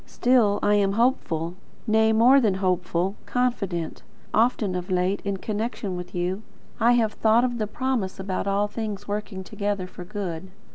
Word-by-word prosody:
Still 240 -5 +3
I 205 - +4
am 200 -1 +3
hopeful, 175 - 0 0.3
nay, 220 0 +3
more 245 +5 +6
than 210 -5 +2
hopeful, 185 -1 0
confident. 200 -10 -1 0.3
Often 220 -4 +2
of 180 0 -4
late, 185 +2 +1
in 200 -1 -2
connection 215 -1 -3
with 180 0 -7
you, 180 +3 -1 0.4
I 235 +2 +5
have 225 -3 +2
thought 225 +2 +3
of 245 -2 -1
the 215 - -1
promise 240 -5 -2
about 190 0 -3
all 200 +1 +1
things 205 -2 -5
working 205 -2 -4
together 205 -1 -3
for 180 0 -9
good. 185 -2 -5
205 Hz, 160 wpm, -25 LUFS, 185-225 Hz, 0.4 s, more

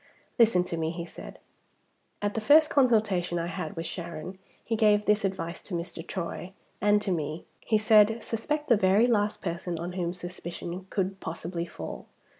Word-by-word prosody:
"Listen 220 -6 +5
to 175 -2 -4
me," 160 -1 0
he 170 0 -5
said. - - -10 0.9
"At 205 0 0
the 225 - -2
first 300 +7 +6
consultation 215 -10 +2
I 170 - -1
had 175 -2 -5
with 165 - -4
Sharon 175 +2 -6 0.3
he 230 - 0
gave 210 -1 +4
this 210 0 +3
advice 185 -3 -3
to 185 - -5
Mr. 170 0 -4
Troy 180 +1 -5 0.3
and 210 -1 +4
to 195 - -1
me. 155 -1 -3
He 220 - +1
said, 215 +1 +5
'Suspect 295 +7 -2
the 235 - +5
very 195 +4 +4
last 210 -4 +1
person 170 -1 -3
on 170 +2 -4
whom 175 -1 -2
suspicion 175 +1 -7
could 195 0 -2
possibly 170 +1 -4
fall. 85 - -8
185 Hz, 175 wpm, -28 LUFS, 170-215 Hz, 0.9 s, first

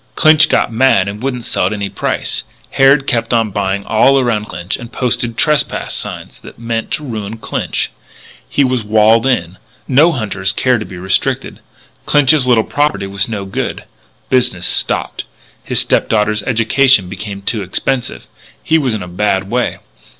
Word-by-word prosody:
Clinch 155 0 +5
got - - +1
mad 110 -5 +3
and 105 +2 -6
wouldn't 125 -2 -3
sell 90 - 0
at 100 - -2
any 100 -1 -3
price. - - -2 0.3
Harrod 135 +1 +4
kept 120 -2 0
on 115 -2 +1
buying 100 0 -2
all 130 +5 +4
around 120 -5 0
Clinch 90 -2 -5
and 120 0 -10
posted 120 -2 -2
trespass 150 -3 0
notices. - - -9
That - - -13
meant 115 +2 -3
ruin 110 -8 -5
to - - -8
Clinch. - - -3 0.6
He 140 - +2
was 130 -3 0
walled 110 +3 +3
in. 90 -8 -1 0.3
No 145 +6 +4
hunters 100 - -1
care 125 -3 +1
to 105 - -5
be 95 - -10
restricted. 95 +2 -1 0.5
Clinch's 145 -2 +4
little 120 -3 +4
property 145 -7 0
was 100 +2 -2
no 105 -3 -4
good. 95 - -4 0.4
Business 120 -9 +1
stopped. - - -1 0.4
His - - +2
stepdaughter's 105 -1 +1
education 115 0 +3
became 100 +1 -7
expensive. 120 +5 -3 0.4
He 160 - +2
was 130 -6 0
in 105 - -4
a - - -8
bad 95 +2 -1
way. 125 0 0
115 Hz, 160 wpm, -15 LUFS, 100-130 Hz, 0.6 s, Clinch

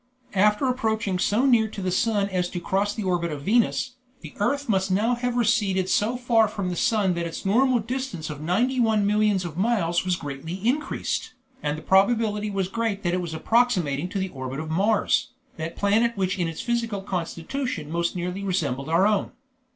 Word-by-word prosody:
After 210 +5 +3
approaching 220 -6 0
so 215 +7 +2
near 235 -5 +4
to 215 - -8
the 185 -1 -1
sun 205 +1 +1
as 180 -2 -1
to 180 - -4
cross 200 +3 0
the 215 - -3
orbit 175 -3 0
of 145 -2 -6
Venus, 240 - +1 0.2
the 160 - -10
earth 280 +7 0
must 195 -3 +1
now 210 +6 +2
have 245 0 -1
receded 205 -5 +2
so 230 +4 +1
far 235 -3 +3
from 200 -3 -3
the - - -3
sun 200 0 +2
that 170 -1 -2
its 165 - -7
normal 250 +6 +3
distance 235 -7 -4
of 145 -1 -8
ninety 235 +11 +1
one 220 -3 +3
millions 210 -2 +2
of 165 -2 -6
miles 190 -6 +1
was 185 -1 +1
greatly 145 +1 -6
increased, 260 -1 -1 0.3
and 150 0 -1
the 155 - -9
probability 210 +2 +2
was 195 -2 -1
great 220 -1 -2
that 175 -1 0
it 180 - 0
was 165 -2 -5
approximating 180 - +1
to 200 - -4
the 190 0 -1
orbit 130 -2 -6
of 155 0 -5
Mars, 210 +8 +1 0.2
that 160 +1 -5
planet 220 +3 +2
which 190 -1 -1
in 175 - +1
its 165 - -5
physical 230 -4 -2
constitution 180 - -4
most 170 +1 -1
nearly 180 +2 -3
resembles 155 -8 -1
our 170 +4 +4
own. 210 -1 +1
200 Hz, 195 wpm, -25 LUFS, 175-230 Hz, 0.3 s, near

